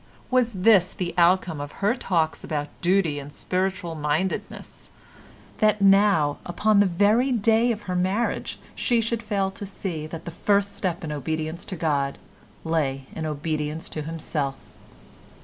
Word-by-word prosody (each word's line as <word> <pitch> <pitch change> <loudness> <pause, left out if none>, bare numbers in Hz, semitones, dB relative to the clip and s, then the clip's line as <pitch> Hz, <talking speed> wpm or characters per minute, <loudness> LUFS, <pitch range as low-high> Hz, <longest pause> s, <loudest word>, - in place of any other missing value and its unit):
Was 250 -2 +3
this 190 -1 +4
the 175 -2 -3
outcome 175 -3 +3
of 145 0 -7
her 205 +3 +1
talks 170 -10 -1
about 145 -1 -3
duty 175 -5 +2
and 140 +1 -9
spiritual 185 +1 -2
mindedness—that 185 +6 -3
now 195 -7 +4
upon 210 +4 +2
the 205 - +5
very 210 +9 +3
day 230 +1 +3
of 215 -2 -4
her 185 - -4
marriage 190 +6 -1 0.2
she 240 -1 +1
should 230 0 -1
fail 200 -3 -1
to 200 - -7
see 170 -5 -5
that 165 +1 -8
the 170 - -5
first 200 +3 +1
step 180 -2 -2
in 155 - -4
obedience 155 +4 -3
to 190 - -5
God 145 -4 0 0.5
lay 140 -5 -1
in 160 -1 -3
obedience 150 +1 -3
to 155 - -5
himself? 150 -3 -3
180 Hz, 150 wpm, -25 LUFS, 155-200 Hz, 0.5 s, the